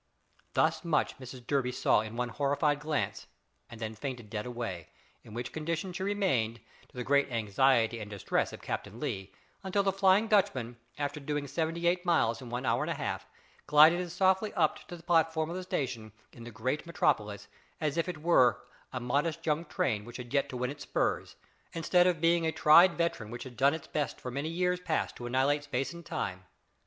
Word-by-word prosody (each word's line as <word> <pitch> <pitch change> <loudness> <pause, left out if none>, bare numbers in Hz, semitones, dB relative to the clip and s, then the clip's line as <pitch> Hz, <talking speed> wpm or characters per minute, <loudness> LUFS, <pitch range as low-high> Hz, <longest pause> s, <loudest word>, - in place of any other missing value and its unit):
Thus - - +2
much 165 -5 0
Mrs 130 -1 -10
Durby 135 -2 0
saw 125 - +3
in 110 +1 -7
one 125 0 -1
horrified 145 +3 +1
glance 150 -1 -2 0.4
and 115 - -10
then 110 -1 -4
fainted 120 -1 -6
dead 105 +1 -3
away, 115 -9 -5 0.3
in 105 - -12
which 120 +1 -4
condition 165 +3 -3
she 180 - -5
remained, 180 - 0 0.3
to - - -17
the 125 - -2
great 140 +1 +2
anxiety 115 +1 +2
and 105 -1 -7
distress 100 -2 -1
of - - -10
Captain - - -5
Lee, 95 0 -4 0.3
until 195 +1 0
the 195 - +2
"Flying 195 +3 +4
Dutchman," 130 - +1 0.2
after 145 +1 -3
doing 145 0 -3
seventy 165 +3 -2
eight 175 +1 +2
miles 155 -10 +2
in 125 - -8
one 125 +2 -3
hour - - +2
and - - -2
a - - -1
half, - - -4 0.4
glided 155 +4 +7
as 180 -2 -4
softly 190 +3 +2
up 160 -5 +2
to 175 - -7
the 165 - -16
platform 160 -1 +2
of - - -4
the 185 - -3
station 125 - -3 0.2
in 115 - -11
the - - -7
great 130 +9 -2
Metropolis 105 -11 0 0.3
as 150 -1 -1
if 170 +1 0
it 155 -4 -6
were 130 -8 +5 0.3
a 125 - -3
modest 150 +7 -1
young 160 +1 0
train 110 -8 -1
which 120 +2 -9
had 125 0 -8
yet 140 -1 +2
to 125 - -5
win 125 +1 -1
its 145 0 -10
spurs, - - -1 0.4
instead 175 +2 +3
of 175 -3 +1
being 165 0 +3
a - - +1
tried 170 +4 +6
veteran 170 -10 -1
which 120 +1 -6
had 130 -2 -10
done 140 +4 +3
its 160 - -8
best 150 -3 -3
for 125 - -6
many 140 +5 -3
years 180 +1 0
past 180 - -1
to 120 - -6
annihilate 135 +4 +2
space 135 0 -2
and 170 -1 -11
time. 95 - -4
145 Hz, 205 wpm, -30 LUFS, 120-170 Hz, 0.4 s, glided